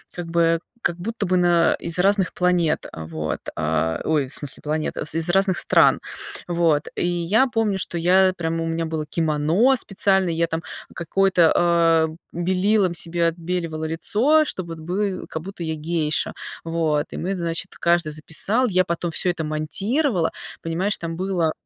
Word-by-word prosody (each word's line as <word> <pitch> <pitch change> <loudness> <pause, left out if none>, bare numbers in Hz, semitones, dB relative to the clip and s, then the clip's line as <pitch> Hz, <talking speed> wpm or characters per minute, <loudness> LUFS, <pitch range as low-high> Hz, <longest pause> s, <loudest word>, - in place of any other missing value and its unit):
как 175 -1 -5
бы, 165 0 +2 0.2
как 175 - 0
будто 210 +4 -4
бы 185 0 +2
на, 175 -1 +3
э, - - -5
из 170 +1 +2
разных 195 0 +2
планет, 180 -3 +1
а 80 -1 -8
вот, 80 -1 -4 0.2
а, 80 +1 -1
ой, 150 -4 +1
в 135 - -5
смысле, 145 -3 -1
планет, 155 +1 -2
в 150 - -2
из 165 +1 0
разных 190 0 +3
стран, - - +4 0.5
вот. 170 -4 +1
И - - -1
я 175 +9 +2
помню, 225 -5 0
что 175 - 0
я, 185 +2 +4
э, 185 - -3
прямо, 165 -2 -2
у 165 - -3
меня 165 0 -2
было 160 -1 -3
кимоно 160 - +2
специально, 195 -3 +1
я 165 0 0
там 165 0 -4 0.3
какое-то, 175 0 +2
а, 165 -2 +3 0.2
белилом 185 +2 +1
себе 170 0 0
отбеливала 165 -1 -3
лицо, 220 - +2
чтобы 185 -9 -5
вот - - -13
бы 185 +3 -2
а, - - -11
как 160 0 -6
будто 195 -2 -7
я 160 -1 -2
гейша, 155 0 -1 0.3
вот. 160 -3 0
И - - -6
мы, 190 +3 -2
значит, 170 -2 -2
каждый 170 -2 +2
записал, 195 +11 +2
я 185 -2 +2
потом 170 0 -3
всё 180 - +1
это 170 -2 -2
монтировала, 180 - 0 0.3
понимаешь, 180 +5 0
там 165 -1 -5
было. 180 -3 0
170 Hz, 175 wpm, -22 LUFS, 160-185 Hz, 0.5 s, стран